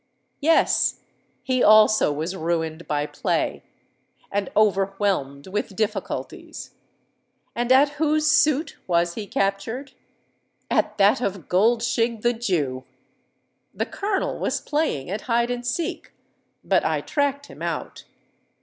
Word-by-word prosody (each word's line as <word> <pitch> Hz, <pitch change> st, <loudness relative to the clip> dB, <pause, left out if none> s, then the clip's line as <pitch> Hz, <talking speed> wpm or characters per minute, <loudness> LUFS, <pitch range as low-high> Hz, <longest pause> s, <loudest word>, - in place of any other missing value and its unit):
Yes: 320 Hz, +3 st, +3 dB, 0.4 s
he 255 Hz, -1 st, 0 dB
also 215 Hz, -4 st, +6 dB
was 160 Hz, +6 st, -3 dB
ruined 165 Hz, -1 st, -2 dB
by 145 Hz, -1 st, 0 dB
play, -, -, -1 dB, 0.7 s
and 200 Hz, -1 st, -1 dB
overwhelmed 195 Hz, -8 st, +1 dB
with 195 Hz, 0 st, -4 dB
difficulties. 215 Hz, +1 st, -4 dB, 0.8 s
And 240 Hz, +1 st, -1 dB
at 275 Hz, +3 st, +6 dB
whose 305 Hz, 0 st, +2 dB
suit 305 Hz, 0 st, +2 dB
was 170 Hz, -1 st, +1 dB
he 210 Hz, +1 st, -6 dB
captured? 200 Hz, +9 st, -2 dB, 0.8 s
At -, -, +1 dB
that 200 Hz, +4 st, +4 dB
of 195 Hz, -7 st, -3 dB
Goldshig, 230 Hz, +3 st, +1 dB
the 240 Hz, 0 st, +3 dB
Jew! 160 Hz, -, -1 dB, 0.9 s
The -, -, -1 dB
Colonel 395 Hz, -1 st, -2 dB
was -, -, -1 dB
playing 290 Hz, -, -2 dB
at 210 Hz, +2 st, -3 dB
hide 235 Hz, +1 st, +2 dB
and 245 Hz, 0 st, -3 dB
seek; 330 Hz, +9 st, -3 dB, 0.5 s
but -, -, +2 dB
I -, -, 0 dB
tracked 285 Hz, -1 st, -1 dB
him -, -, -14 dB
out. -, -, -4 dB
215 Hz, 120 wpm, -23 LUFS, 185-255 Hz, 0.9 s, also